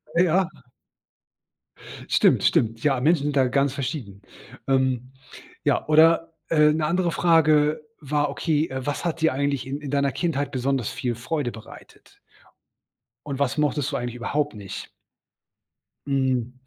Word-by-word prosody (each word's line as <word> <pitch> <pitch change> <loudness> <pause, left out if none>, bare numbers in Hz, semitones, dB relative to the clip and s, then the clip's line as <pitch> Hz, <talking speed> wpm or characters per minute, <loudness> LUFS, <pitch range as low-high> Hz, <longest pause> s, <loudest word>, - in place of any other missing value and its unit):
äh, 175 - +5
ja. 180 +1 +2 1.6
Stimmt, - - +3
stimmt. 115 0 +1
Ja, 135 -4 +2
Menschen 150 +2 +2
sind 145 -1 -2
da 130 -2 +4
ganz 140 +1 +1
verschieden. 125 - -5 0.5
Ähm, 130 -1 0 0.5
ja, - - +1
oder, 165 +2 +4 0.2
äh, 150 -2 +5
'ne 155 0 -1
andere 175 +2 +1
Frage 155 -2 +3 0.2
war, 145 0 0
okay, 155 +2 0
äh, 130 -1 -5
was 145 +3 -3
hat 165 -1 -2
dir 160 - +3
eigentlich 140 -1 -1
in 140 +2 -4
in 145 -2 -6
deiner 140 -1 +1
Kindheit 145 -5 -2
besonders 130 -2 -1
viel 120 -2 -3
Freude 125 +3 -3
bereitet? 110 - -15 1.1
Und 140 -1 -5
was 140 +1 0
mochtest 145 -2 0
du - - -2
eigentlich 120 -1 -4
überhaupt 145 +4 -2
nicht? 100 -3 -8 1.2
Hm, 130 -3 0
140 Hz, 145 wpm, -24 LUFS, 130-155 Hz, 1.6 s, äh